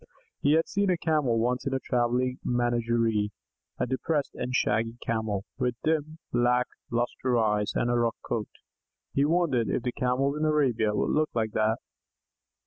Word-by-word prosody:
He 145 - +4
had 160 +1 +3
seen 200 0 0
a 180 - +3
Camel 150 -8 +1
once 125 +3 0
in 135 - 0
a - - 0
travelling 125 0 0
menagerie; 115 -3 +1 0.5
a - - 0
depressed 140 +3 -1
and 125 - -4
shaggy 115 -2 +1
Camel, 110 -3 -1
with 125 -2 0
dim, 155 0 0 0.2
lack 125 +1 +3 0.2
lustre 120 +1 0
eyes 105 -2 +1
and 120 - +1
a - - +2
rough 120 -1 +1
coat. 110 -3 -2 0.6
He 140 - +3
wondered 150 - +2
if 115 - -1
the 125 - -1
Camels 130 +4 0
in - - -1
Arabia 125 -9 +2
would - - +1
look 155 0 +2
like 110 -2 0
that. 110 +1 +1
125 Hz, 165 wpm, -28 LUFS, 115-140 Hz, 0.6 s, He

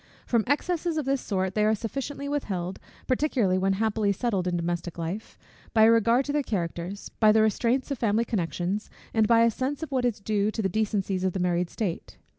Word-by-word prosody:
From 230 -3 +2
excesses 330 +3 0
of 305 - -1
this 270 0 0
sort 190 -2 -1
they 210 - +1
are 215 +1 +3
sufficiently 275 +6 -4
withheld, 190 -11 -3 0.3
particularly 250 -9 +1
when 195 +1 +2
happily 215 0 +1
settled 200 -3 -1
in 175 -1 0
domestic 175 0 -3
life, 170 +6 -5 0.4
by 220 - +6
a 225 - +7
regard 230 +3 +3
to 285 - -2
their 295 - +2
characters, 180 -3 -4
by 215 -1 +6
the 215 0 +4
restraints 240 +5 +1
of 275 - -2
family 225 0 +2
connections, 185 0 -2 0.2
and 220 -1 +3
by 230 0 +5
a 230 - +4
sense 270 +6 -3
of 315 - -6
what 260 -2 +1
is 240 -4 0
due 205 0 0
to 220 0 -3
the 190 - +1
decencies 200 -2 -1
of 185 -1 +1
the 190 - -2
married 180 -1 0
state. 190 -7 -4
215 Hz, 210 wpm, -27 LUFS, 190-245 Hz, 0.4 s, a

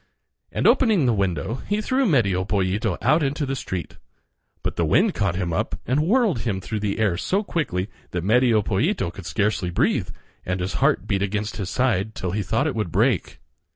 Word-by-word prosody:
And - - -2
opening 215 - +4
the 120 - +3
window 100 - -1
he 205 +1 +1
threw 260 +4 +1
Medio 100 - +2
Pollito 100 0 0
out 155 +2 +4
in 135 -2 +1
the 140 -3 -2
street. 95 -8 -5 0.6
But - - -2
the 85 - 0
wind 185 - +3
caught 100 -5 0
him 90 -3 -2
up - - -2
and 130 +4 +1
whirled 200 - +2
him 105 -4 -2
through 105 +3 -4
the 100 -1 -2
air 105 -6 +1
so 195 - 0
quickly 105 - -2 0.2
that 90 -2 -3
Medio 115 +1 +3
Pollito 115 - 0
could 90 -2 -9
scarcely 100 +3 0
breathe, 85 - +1 0.3
and 90 0 -2
his 90 +1 -2
heart - - +3
beat 95 -1 0
against 105 +2 -2
his 95 -4 -3
side 110 -5 0
till 90 - -3
he 105 +3 -1
thought 110 +8 0
it 155 - 0
would 105 -7 -2
break. 105 - +1
105 Hz, 195 wpm, -23 LUFS, 95-135 Hz, 0.6 s, opening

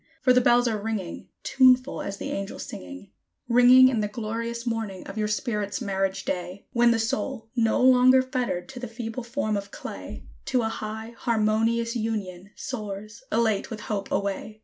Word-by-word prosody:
for 265 -5 +4
the 250 - +5
bells 240 0 +4
are 215 -3 -1
ringing, 205 -5 -4
Tuneful 255 0 +4
as 200 - -5
the - - -5
angels 195 0 -4
singing, 90 +2 -9 0.4
Ringing 245 +2 +7
in 250 -4 +1
the 210 - 0
glorious 230 +2 -4
morning 225 -5 -3
of 195 - -8
your 215 -1 0
spirit's 210 -2 -2
marriage 195 -4 -1
day, 180 +1 -4
When 240 -1 +5
the 230 - +3
soul, 225 +1 -2
no 225 -2 +2
longer 255 0 +6
fettered 250 -8 -2
to 260 -2 -8
the 245 - -5
feeble 230 +1 -5
form 235 -3 -2
of 200 0 -4
clay, - - -8 0.2
To 250 -3 +1
a 220 - 0
high, 220 +1 -6
harmonious 230 +1 +1
union, 200 -5 -3
soars, 215 -2 -6
elate 220 -3 +1
with 220 -3 -6
hope 200 -3 -3
away. 200 +2 -2
225 Hz, 170 wpm, -26 LUFS, 205-240 Hz, 0.4 s, Ringing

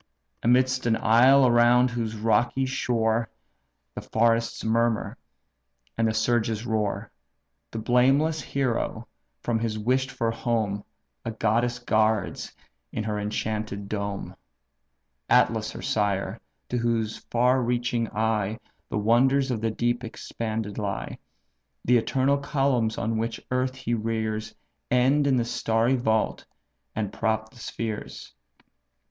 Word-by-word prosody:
Amidst 130 +1 +2
an 115 - +3
isle, 130 +5 +6
around 120 +1 +5
whose 115 -2 -3
rocky 120 +4 +2
shore 115 -3 0 0.6
The - - -6
forests 115 0 +1
murmur, 115 -1 +1 0.8
and 115 - +2
the 110 - 0
surges 115 0 +1
roar, 105 -2 -1 0.6
The - - -7
blameless 135 +7 +3
hero 135 -4 -2 0.4
from 115 -2 0
his 110 -1 -2
wish'd 130 +5 +1
for 115 -3 -1
home 110 -3 -1 0.4
A - - -3
goddess 115 +2 0
guards 110 -6 0 0.4
in 110 - -3
her 105 -1 -2
enchanted 105 -1 -3
dome; 100 -1 -4 0.9
(Atlas - - +3
her - - -8
sire, 100 0 0 0.3
to 125 - -1
whose 115 -2 0
far 125 +2 +3
piercing 120 -1 0
eye 110 -1 0 0.3
The - - -2
wonders 130 +5 +3
of 115 -3 -2
the 115 - +1
deep 120 +2 -1
expanded 110 -2 -4
lie; 100 -2 -4 0.7
The 125 0 +5
eternal 135 +4 +1
columns 135 -6 0
which 115 0 -2
on - - -26
earth 130 0 0
he 125 -2 -3
rears 110 -1 -2 0.3
End 135 +4 +3
in 135 - +3
the 120 -2 +1
starry 115 +2 +1
vault, 110 -3 0 0.5
and 105 -2 -2
prop 110 0 -1
the 125 - -17
spheres). 110 -2 -6
115 Hz, 125 wpm, -26 LUFS, 110-125 Hz, 0.9 s, isle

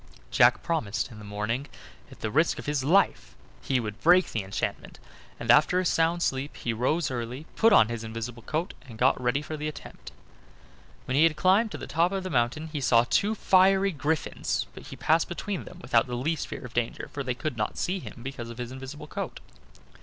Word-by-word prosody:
Jack - - +5
promised 120 -12 -1
that - - -12
in 105 - -11
the - - -10
morning, 105 +6 -3 0.4
at - - -14
the 110 - -2
risk 160 +6 +2
of - - -7
his 145 -2 -1
life, 185 +8 +2 0.3
he 130 - 0
would 105 -1 -5
break 180 +2 +5
the 110 - -1
enchantment; 95 0 -4 0.4
and 115 0 +3
after 150 +8 +5
a 185 - -1
sound 170 +1 +2
sleep 135 +1 -2
he 120 - -2
rose 135 +8 0
early, 125 +4 -5
put 225 - +5
on 115 - +7
his 115 -1 -5
invisible 115 +2 -6
coat, 160 - -3
and 115 -4 -12
got 125 +2 +3
ready 125 +4 0
for 155 - -5
the 150 0 -4
attempt. 150 - -9 0.9
When 130 - -2
he 145 - +4
had 165 -2 +2
climbed 190 +8 +3
to - - -4
the - - -7
top 170 +3 +1
of 195 -1 -2
the 185 - -5
mountain 130 +5 0
he 145 - -2
saw 120 -3 +5
two 210 - +2
fiery 195 0 +4
griffins, 155 0 -1
but - - -11
he - - -8
passed 160 +1 +2
between 190 +2 -4
them 180 - -11
without 120 -7 +2
the 125 - -4
least 155 +6 -1
fear - - -7
of 125 - -10
danger, 120 -1 -2
for 145 - -3
they 130 -2 -2
could 155 +1 -3
not 105 -1 -2
see 190 +2 -1
him 125 - -10
because 125 -3 -6
of 115 - -9
his 125 0 -5
invisible 135 +3 -8
coat. - - -5
135 Hz, 220 wpm, -27 LUFS, 120-165 Hz, 0.9 s, on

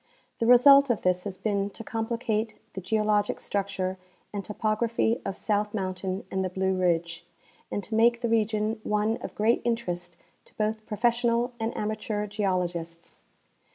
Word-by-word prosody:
The 230 - +1
result 275 +3 +8
of 240 - 0
this 180 0 +1
has 190 -2 -5
been 200 0 -1
to 225 - -9
complicate 225 -1 -2 0.2
the 190 - -5
geologic 210 +1 +1
structure 190 -2 -2 0.3
and 200 -1 -3
topography 225 +2 0
of 195 - -4
South 210 0 0
mountain 185 -1 -3
and 190 0 0
the 185 - -1
Blue 190 +1 0
ridge, 170 -2 0 0.5
and 205 - -3
to 215 - -7
make 235 +2 +4
the 235 - 0
region 220 0 +1
one 210 +2 0
of - - -8
great 220 +3 +2
interest 180 -7 -2 0.3
to - - -18
both 215 0 -2
professional 235 +2 +1
and 225 +1 -2
amateur 215 0 -2
geolo 200 -3 0
gists. 170 -1 -7
210 Hz, 155 wpm, -27 LUFS, 190-225 Hz, 0.5 s, result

